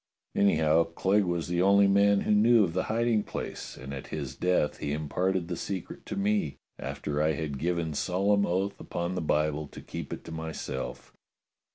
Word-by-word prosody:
Anyhow, 80 -4 +4
Clegg 95 +4 +1
was 85 -2 -1
the 85 0 0
only 100 +1 +6
man 100 0 +4
who - - 0
knew 110 +2 +6
of 85 -4 -1
the 95 - 0
hiding 115 -1 +2
place, - - -6
and 65 +2 -7
at 70 - -7
his 70 -3 -5
death 90 -2 +1
he 70 - -2
imparted 90 +4 -1
the 90 - -3
secret 95 +1 -5
to - - -4
me, 100 -6 0 0.2
after 75 0 -3
I 80 +1 +3
had 70 -3 -4
given 85 -1 -1
solemn 100 +6 +2
oath 95 +3 -1
upon 85 +1 -3
the 90 - -2
Bible 75 -1 0
to - - -11
keep - - -7
it - - -5
to - - -9
myself." 80 -4 -5
90 Hz, 185 wpm, -29 LUFS, 75-100 Hz, 0.2 s, only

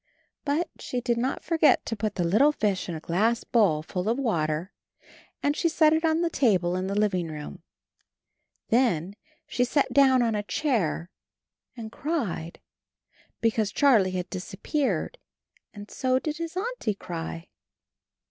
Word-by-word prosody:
But 305 +4 0
she 250 - -3
did 240 -1 0
not 255 +3 -2
forget 325 -2 +3
to 225 - -3
put 210 -1 -3
the 180 - 0
little 215 - +4
fish 205 -9 -1
in 170 - -3
a - - -5
glass 215 +9 0
bowl 185 -10 +2
full 180 +4 -3
of 235 - +1
water, 170 - -1 0.7
and 285 +1 +2
she 335 - +1
set 315 -1 +4
it 320 +1 +1
on 320 0 +2
the 340 - +1
table 185 - +2
in 185 +1 -2
the 200 +1 -1
living 185 -5 +1
room; 150 -1 -8 1.1
then 205 -7 +1 0.3
she 245 - 0
sat 260 0 +1
down 260 -2 +5
on 230 -1 +1
a 210 - 0
chair 205 - -1 0.7
and 220 -2 -7
cried, 230 - -3 0.8
be 230 - +3
cause 215 -2 -1
Charlie 235 -10 +4
had 180 0 -3
disappeared, 205 - -2 0.5
and 205 0 -11
so 255 -1 +1
did 305 +3 -3
his 335 +1 -5
Auntie 415 - -2
cry. 165 -2 -6
225 Hz, 155 wpm, -26 LUFS, 185-280 Hz, 1.1 s, down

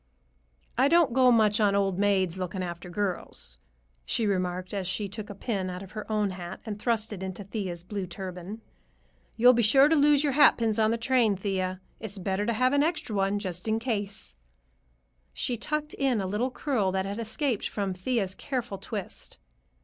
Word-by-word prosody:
"I 265 - +6
don't 330 -4 +4
go 255 -1 +5
much 215 -2 +4
on 205 -2 +3
old 195 -2 +1
maids 190 -3 +2
looking 185 0 -3
after 175 0 -6
girls," 175 - -4 0.4
she 230 - 0
remarked 185 -2 -1
as 195 -3 -2
she 200 +2 -1
took 210 +1 -7
a 205 - -7
pin 195 -3 -2
out 180 +1 -6
of 190 - -12
her 215 0 -6
own 210 -2 +1
hat 180 0 -7
and 210 -2 -5
thrust 225 -1 0
it 190 - -7
into 190 +1 -5
Thea's 190 -4 -4
blue 195 0 -4
turban. 185 +3 -7 0.8
"You'll 245 +2 +7
be 240 - +3
sure 270 +6 +6
to 320 - +4
lose 295 -1 +5
your 285 -2 +1
hatpins 230 -6 +4
on 215 - +3
the 230 - +1
train, 230 -3 +2
Thea. 185 -1 -2 0.2
It's 210 -2 -5
better 195 +2 -1
to 235 - +2
have 255 +4 +2
an 285 - +4
extra 305 -8 -1
one 195 +1 +1 0.3
in 220 0 +1
case." 205 - -3 1.0
She 245 - 0
tucked 300 +5 -2
in 265 -5 +1
a 195 - -1
little 210 +7 0
curl 245 -8 0
that 190 0 0
had 200 +3 -4
escaped 230 +1 -1
from 200 -2 -2
Thea's 190 +1 -1
careful 245 -4 -4
twist. 205 -4 -6
205 Hz, 190 wpm, -28 LUFS, 190-235 Hz, 1.0 s, You'll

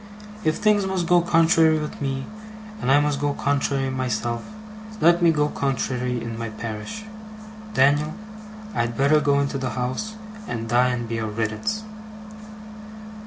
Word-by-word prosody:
If 155 -2 +2
thinks 210 -2 +3
must 190 -2 -1
go 175 +1 +5
contrary 165 -2 +4
with 150 -1 -5
me, 135 -1 -2 0.6
and 130 - +1
I 145 - +6
must 145 -1 0
go 145 -1 0
contrary 140 -1 0
myself, 120 -2 -2 0.6
let 170 +1 +5
me 170 -1 +6
go 150 -2 +2
contrary 125 -3 -1
in 115 -1 -6
my 115 -1 -3
parish. 110 - -6 0.7
Dan'l, 145 +5 +3 0.6
I'd 115 - -1
better 140 +3 +4
go 140 -1 +3
into 140 -1 -1
the 125 -4 -3
house, 130 +14 -3 0.3
and 115 -1 -4
die 120 +2 +3
and 120 -2 -2
be 115 0 -3
a 110 - -2
riddance! 110 - -2
140 Hz, 150 wpm, -23 LUFS, 120-160 Hz, 0.7 s, I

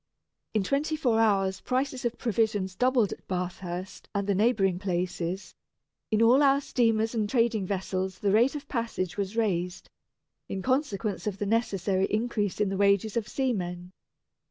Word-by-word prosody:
In 210 - +3
twenty 290 +8 0
four 245 -7 +1
hours 195 -4 +2
prices 260 -1 -1
of 240 0 -1
provisions 215 -4 0
doubled 245 0 +2
at - - -15
Bathurst 180 0 -5
and 200 0 0
the 200 - +1
neighbouring 195 -3 +2
places. 180 0 -3 0.6
In 220 +1 +3
all 250 +5 +6
our 275 -1 +5
steamers 225 -4 +1
and 215 -3 0
trading 230 -5 +1
vessels 190 -1 -2
the 200 - 0
rate 235 +7 +4
of 290 - -6
passage 230 -8 -2
was 200 +2 -3
raised, 180 -5 -1 0.6
in 190 -1 -4
consequence 230 -7 -1
of 200 -2 -2
the 205 - -2
necessary 195 -3 +1
increase 215 -3 -1
in 210 -2 +2
the 195 - -2
wages 200 +1 +2
of 230 -2 -1
seamen. 180 -10 -2
210 Hz, 155 wpm, -28 LUFS, 190-235 Hz, 0.6 s, all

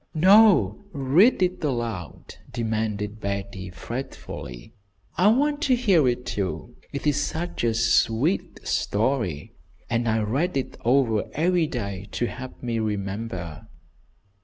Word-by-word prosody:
"No, 185 - +5
read 155 - +4
it 180 -1 -1
aloud!" 120 - -4 0.2
demanded 110 -2 -2
Betty, 100 -2 -4
fretfully. 90 - -7 0.4
"I 185 - +4
want 290 +6 +3
to 265 -5 +3
hear 195 - +3
it, 125 0 -1
too. 95 +4 -4 0.2
It 140 - -5
is 145 -1 +2
such 170 -3 -4
a 115 -1 +2
sweet 115 - +1
story, 105 - -1 0.4
and 115 0 +1
I 110 0 +1
read 140 - 0
it 135 - -3
over 120 -3 +2
every 170 +1 +2
day 100 -7 -5
to 120 - 0
help 130 +2 -8
me 115 -2 -1
remember." 100 -4 -4
120 Hz, 125 wpm, -25 LUFS, 105-155 Hz, 0.4 s, No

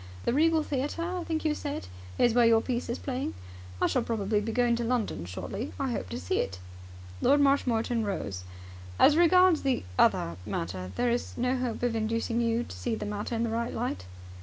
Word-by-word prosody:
The - - +2
Regal 320 +2 +3
Theatre, 290 +4 -2
I 360 +1 -3
think 320 -1 -2
you 305 - +3
said, 290 - -4 0.3
is 240 - +4
where 240 0 +5
your 225 -1 +6
piece 245 +1 -3
is 235 - -1
playing? 265 - -3 0.4
I - - +3
shall 255 - +2
probably 210 -2 0
be 225 +2 -3
going 240 0 +2
to 240 - -2
London 230 - -1
shortly. 195 - -5
I 270 -2 -1
hope 95 - -3
to - - -4
see 90 +1 -1
it." 95 -2 -2 0.6
Lord 285 - +4
Marshmoreton 245 -5 +2
rose. 100 - -3 0.5
"As 295 - +6
regards 350 0 +5
the 270 -2 0 0.2
other 85 0 +3
matter, 90 +1 -4
there 245 -1 +1
is 240 - -2
no 250 +2 +1
hope 250 -2 -3
of 240 -2 +1
inducing 230 +1 0
you 230 0 +1
to - - -9
see 235 -2 -2
the 215 - -5
matter 210 +3 -3
in 230 - 0
the 230 - -1
right 235 +1 -2
light?" 90 -1 -3
235 Hz, 205 wpm, -29 LUFS, 215-275 Hz, 0.6 s, your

